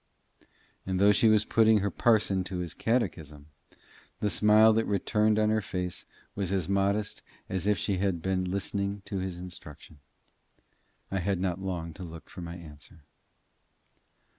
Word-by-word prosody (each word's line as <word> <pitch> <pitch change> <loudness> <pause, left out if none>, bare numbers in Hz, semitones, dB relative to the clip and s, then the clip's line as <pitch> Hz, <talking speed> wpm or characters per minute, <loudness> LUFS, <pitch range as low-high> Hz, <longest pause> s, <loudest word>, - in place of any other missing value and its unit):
And 95 -1 -2
though 100 +1 +6
she 105 +2 +4
was 110 -1 +4
putting 110 -1 +4
her 100 0 -1
parson 105 -3 +2
to 90 0 -5
his 90 -2 -4
catechism, 80 - -2 0.7
the 105 - 0
smile 110 +1 +6
that 115 +1 +1
returned 105 +1 +1
on 110 0 +3
her 110 0 +2
face 90 -2 -4 0.3
was 95 -2 -3
as 95 -4 0
modest 100 +1 0 0.3
as 95 +1 -2
if 105 -1 +3
she 95 +3 -1
had 95 -1 +1
only - - -7
been 95 +1 0
listening 100 +1 -2
to 100 - -3
his 95 -1 -4
instruction. 80 -4 -9 1.1
I 95 - 0
had 95 0 -1
not 90 0 -2
long 85 -4 -4
to 95 - -9
look 85 -2 -10
for 90 - -8
my 85 0 -6
answer. 80 +1 -11
95 Hz, 165 wpm, -29 LUFS, 90-105 Hz, 1.1 s, though